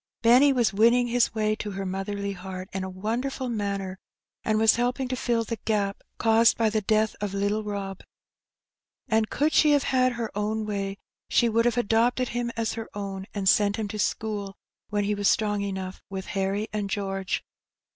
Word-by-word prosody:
Benny 250 +5 +7
was 240 -7 +2
win 225 +4 +5
ning 245 -1 +2
his 235 -1 +2
way 215 -1 +1
to 210 - -4
her 195 -1 -4
motherly 200 +2 -3
heart 185 -1 -7
in 190 0 -2
a 190 - -4
wonderful 240 +7 -3
manner, 200 -4 -3 0.4
and 215 -1 +1
was 220 +1 +5
helping 250 +2 0
to 255 - -1
fill 235 -2 0
the 230 +1 -4
gap 200 -2 0 0.2
caused 225 0 +4
by 225 -2 +2
the 215 0 +1
death 215 +1 +1
of 205 -2 -2
httle 205 +2 0
Rob. 200 -2 -5 1.1
And 220 -1 +2
could 300 +2 +1
she 300 -1 +5
have 285 - +3
had 255 -1 +2
her 230 -3 -5
own 215 +1 -1
way, 200 -1 -3 0.3
she 235 - +3
would 230 +1 +2
have 240 0 +2
adopted 240 +2 +2
him 240 0 -2
as 225 -1 0
her 225 -1 -6
own, 195 -1 -5
and 195 -2 -1
sent 205 +1 +4
him 220 -2 -3
to 215 - -5
school 205 -2 -2 0.3
when 205 -1 0
he 205 +1 0
was 205 -1 0
strong 210 -2 +2
enough, 190 -2 -4
with 190 -1 -5
Harry 195 +2 -1
and 205 -2 -2
George. 195 -1 -2
215 Hz, 195 wpm, -26 LUFS, 200-230 Hz, 1.1 s, Benny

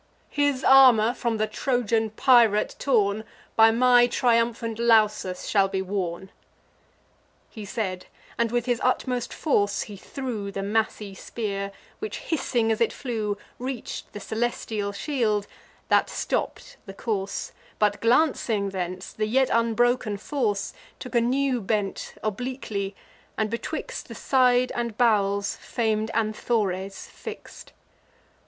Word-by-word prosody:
His 285 -2 +1
armour, 245 -4 +7
from 235 -2 -1
the 215 - +1
Trojan 225 0 0
pirate 225 -2 +4
torn, 215 -5 +2 0.3
By 225 0 +7
my 245 +1 +5
triumphant 230 -2 +1
Lausus 215 -5 +2
shall 195 -2 +3
be 190 0 -2
worn." 190 -1 -4 1.2
He 215 -2 -8
said; 190 -3 -4 0.3
and 235 -1 0
with 240 -1 0
his 245 -2 0
utmost 250 -1 0
force 205 -9 +1
he 210 - -9
threw 220 -2 -5
The 195 0 -4
massy 210 -1 -1
spear, 200 -1 -4 0.3
which, 430 - -4
hissing 240 -7 0
as 220 - -1
it 230 - +3
flew, 215 -5 -3 0.2
Reach'd 255 0 -5
the 205 - -7
celestial 220 -1 -2
shield, 215 -3 0 0.4
that - - +3
stopp'd - - -3
the 195 - -8
course; 200 -4 -3 0.3
But, 210 -1 +1
glancing 230 -5 +2
thence, 185 0 -5
the 215 0 -1
yet 260 +4 +2
unbroken 230 -1 +2
force 210 -3 -2 0.2
Took 250 - -9
a 235 - +4
new 255 +1 +1
bent 205 -1 -2
obliquely, 215 -3 -3 0.4
and 220 -1 0
betwixt 235 - -4
The - - -9
side 255 -1 +3
and 235 -2 -3
bowels 200 -4 +2
fam'd 220 -2 -1
Anthores 210 -3 -1
fix'd. 445 -1 -10
225 Hz, 125 wpm, -25 LUFS, 205-245 Hz, 1.2 s, armour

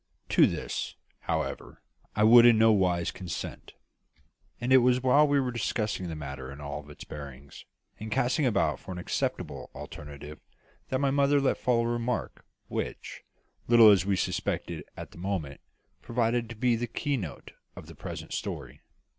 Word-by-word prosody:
To - - +6
this, - - -4 0.2
however, - - -4 0.3
I 105 - +2
would 115 +2 +9
in 120 -2 +7
no 110 0 +6
wise 90 -4 +2
consent; 90 -2 -7 0.9
and 125 +2 +1
it 130 - +9
was 125 +1 +3
while 145 +4 +5
we 145 -1 +3
were 130 -2 -1
discussing 105 -5 -2
the 80 - -5
matter 70 -3 -7
in 70 - -10
all 75 +1 -6
its 75 - -10
bearings, 70 -1 -10 0.3
and 110 0 -7
casting 135 +4 +2
about 115 - +1
for - - -9
an - - -7
acceptable 90 - -3
alternative, 75 +1 -9 0.5
that 130 - +1
my 140 -1 +2
mother 140 +1 +3
let 135 - +1
fall 120 -2 +2
a - - -1
remark, 120 0 -2 0.2
which, - - -5 0.5
little 115 -2 +8
as 95 -3 +4
we 100 0 +1
suspected 85 -2 -2
it 75 - -12
at - - -8
the - - -13
moment, 85 -7 -3 0.4
proved 120 0 0
to 115 - -7
be 120 +2 +2
the 120 +1 -2
key 145 +5 -2
note 90 - -6 0.2
of - - -10
the - - -12
present - - -7
story. - - -5
110 Hz, 170 wpm, -28 LUFS, 85-125 Hz, 0.9 s, would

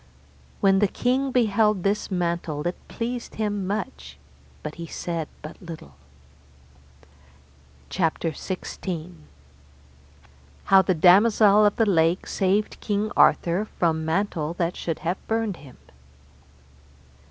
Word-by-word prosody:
When 195 -1 +4
the 205 - +4
king 260 +6 0
beheld 215 -5 +2
this 200 +1 0
mantle 170 -4 -2
it 175 - -1
pleased 240 +1 -5
him 205 -3 -2
much, 70 - -5 0.5
but 150 - -5
he 165 - -6
said 165 -1 -4 0.2
but 155 - -10
little. 165 - -10 2.0
CHAPTER 165 -2 0
XVI. 175 - -6 1.5
How 195 0 +6
the 185 -1 0
Damosel 205 +4 +6
of 205 - 0
the 225 - +2
Lake 170 -2 +2
saved 195 +2 0
King 210 0 -1
Arthur 175 +5 +3
from 160 -2 +1
mantle 165 -1 -1
that 175 -1 -1
should 165 -2 -3
have 175 +3 0
burnt 225 -4 -1
him. 135 -3 -15
185 Hz, 115 wpm, -24 LUFS, 165-210 Hz, 2.0 s, How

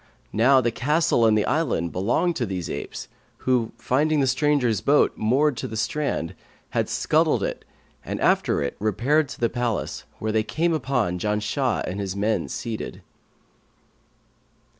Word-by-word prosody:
Now 130 +5 +5
the 120 -1 0
castle 150 -1 +2
and 110 -1 +4
the 105 - +1
island 130 - 0
belonged 120 - +1
to 120 - -1
these 90 -3 -4
apes, - - -6 0.4
who, 125 -3 +2
finding 145 +6 +1
the 135 - +3
strangers' 130 -5 +2
boat 145 +1 +3
moored 135 +6 +2
to - - -3
the 110 - -6
strand, 110 - -1 0.4
had - - 0
scuttled - - +2
it - - -3 0.4
and - - -4
after 70 - +2
repaired 130 +8 +1
to - - -9
the 120 - +3
palace, 120 -1 -3
where 110 - -2
they 110 0 +2
came 165 +10 0
upon 120 - 0
Janshah 105 +6 0
and 95 +3 -4
his 100 -1 -3
men 105 -2 0
seated." 115 -2 -5
120 Hz, 150 wpm, -24 LUFS, 105-140 Hz, 0.4 s, Now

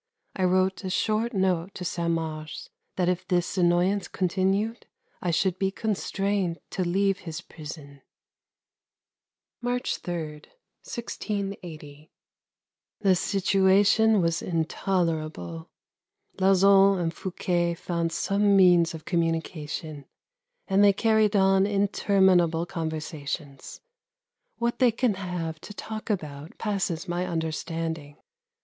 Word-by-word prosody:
I 185 - +1
wrote 185 +1 +2
a 190 - -3
short 215 +4 0
note 190 -3 0
to 180 - -6
Saint 170 0 -1
Mars 155 -1 -5 0.2
that 180 -1 +1
if 180 0 -1
this 175 -2 0
annoyance 180 +2 +2
continued 195 +5 -1 0.3
I 180 - -1
should 185 +2 +1
be 195 0 +2
constrained 200 -3 -1
to 185 - -1
leave 195 +2 +1
his 165 -4 -6
prison. 150 -4 -10 1.6
March 245 +1 -1
3, 170 -3 -4 0.5
1680. 180 - -6 0.9
The 195 -3 +4
situation 195 +3 +3
was 165 -1 0
intolerable. 160 - -2 0.7
Lauzun 195 +1 +5
and 165 -1 -1
Fouquet 175 -2 -1
found 170 -1 -2
some 200 +3 +2
means 175 -3 +5
of 160 - -10
communication 160 -3 -2 0.6
and 195 0 +4
they 200 -1 +6
carried 220 0 +2
on 195 0 +4
interminable 190 -4 +3
conversations. 155 -4 -5 0.8
What 235 0 -1
they 250 -2 +5
can 235 0 +1
have 175 -4 -4
to 210 - -10
talk 220 +2 -6
about 155 -6 -4
passes 195 -6 -2
my 175 +1 -2
understanding. 160 -2 -3
180 Hz, 110 wpm, -26 LUFS, 165-195 Hz, 1.6 s, they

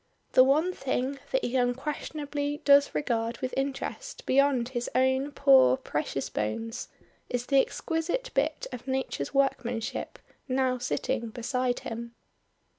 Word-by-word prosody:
The 255 - +7
one 305 +7 +3
thing 270 -2 -2
that - - +1
he 245 - -2
unquestionably 290 +3 -2
does 280 0 +6
regard 230 -4 -1
with 255 -1 -4
interest 280 - -4
beyond 265 -3 +3
his 245 -2 -3
own 260 +2 +2
poor 130 - +6
precious 145 -2 -3
bones, 225 - -3 0.4
is 245 0 -2
the 275 0 +5
exquisite 345 - -2
bit 295 +3 0
of 250 +1 -8
nature's 260 - -2
workmanship 245 -4 -1 0.3
now 255 -1 +1
sitting 245 -1 -2
beside 250 +2 -1
him. 235 +1 -6
260 Hz, 125 wpm, -28 LUFS, 240-285 Hz, 0.4 s, The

